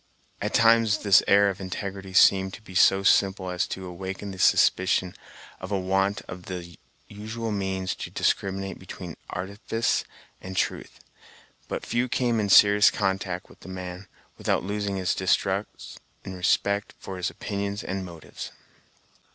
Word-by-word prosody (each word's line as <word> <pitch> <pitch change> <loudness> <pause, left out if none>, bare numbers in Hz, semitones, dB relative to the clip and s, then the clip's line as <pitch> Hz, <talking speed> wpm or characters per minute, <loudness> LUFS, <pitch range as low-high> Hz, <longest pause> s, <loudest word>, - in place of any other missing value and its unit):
At 105 - -2
times 115 -2 +4
this 100 -2 +6
air 100 0 +6
of 95 - -9
integrity 95 0 -5
seemed 95 0 +5
to - - -14
be 95 - -12
so 95 +1 +5
simple 95 -1 +3
as 90 +1 -1
to 95 - -6
awaken 95 +2 -6
the 95 - -9
suspicion 95 -1 +3 0.5
of 95 +2 -8
a 100 - +1
want 95 +2 0
of 90 0 -9
the 85 -2 -7 0.3
usual 110 +2 -5
means 95 -2 -2
to - - -6
discriminate 95 0 -1
between 90 -2 -8
artifice 100 +5 -1 0.4
and 95 0 -7
truth; - - -2 0.7
but - - -4
few 120 +1 0
came 120 -2 +1
in 105 -1 -1
serious 100 +1 +7
contact 95 -2 -2
with - - -18
the - - -12
man, 90 +1 -7 0.3
without - - 0
losing 100 0 -2
this 90 -2 0
distrust 95 +2 -1 0.3
in 95 - -6
respect 100 +3 0
for 95 - -7
his 90 - -1
opinions 100 0 -4
and 95 0 -3
motives. 85 -3 -9
95 Hz, 150 wpm, -26 LUFS, 95-100 Hz, 0.7 s, serious